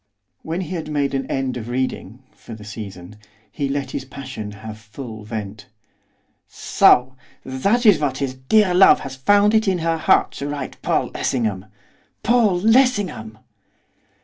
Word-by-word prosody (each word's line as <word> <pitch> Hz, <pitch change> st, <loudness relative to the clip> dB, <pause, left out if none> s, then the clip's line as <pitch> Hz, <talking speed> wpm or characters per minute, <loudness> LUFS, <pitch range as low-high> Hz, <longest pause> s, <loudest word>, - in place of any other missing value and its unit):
When 165 Hz, +3 st, -4 dB
he 185 Hz, 0 st, -6 dB
had 160 Hz, -3 st, -5 dB
made 145 Hz, -2 st, -1 dB
an 135 Hz, -1 st, -2 dB
end 135 Hz, -2 st, -2 dB
of 115 Hz, 0 st, -7 dB
reading, 125 Hz, -2 st, -4 dB
for 115 Hz, -, -11 dB
the 105 Hz, -, -12 dB
season, 105 Hz, -2 st, -9 dB, 0.3 s
he 140 Hz, -1 st, -3 dB
let 140 Hz, 0 st, -3 dB
his -, -, -4 dB
passion 130 Hz, -5 st, -8 dB
have 110 Hz, +2 st, -9 dB
full 110 Hz, 0 st, -9 dB
vent. 105 Hz, -1 st, -7 dB, 0.8 s
'So! 130 Hz, +1 st, +3 dB, 0.3 s
That 200 Hz, -, 0 dB
is 205 Hz, -8 st, +6 dB
what 140 Hz, -3 st, -1 dB
his 135 Hz, -2 st, -2 dB
dear 180 Hz, +10 st, +2 dB
love 190 Hz, +2 st, +6 dB
has 135 Hz, -1 st, -7 dB
found 205 Hz, +10 st, +3 dB
it 220 Hz, -1 st, +2 dB
in 190 Hz, -2 st, +2 dB
her 165 Hz, -1 st, -1 dB
heart -, -, +3 dB
to 140 Hz, -, -3 dB
write 145 Hz, -2 st, -6 dB
Paul -, -, 0 dB
Lessingham! 110 Hz, -6 st, -2 dB, 0.6 s
Paul 225 Hz, -7 st, +3 dB
Lessingham! 205 Hz, -, +2 dB
135 Hz, 155 wpm, -21 LUFS, 110-180 Hz, 0.8 s, is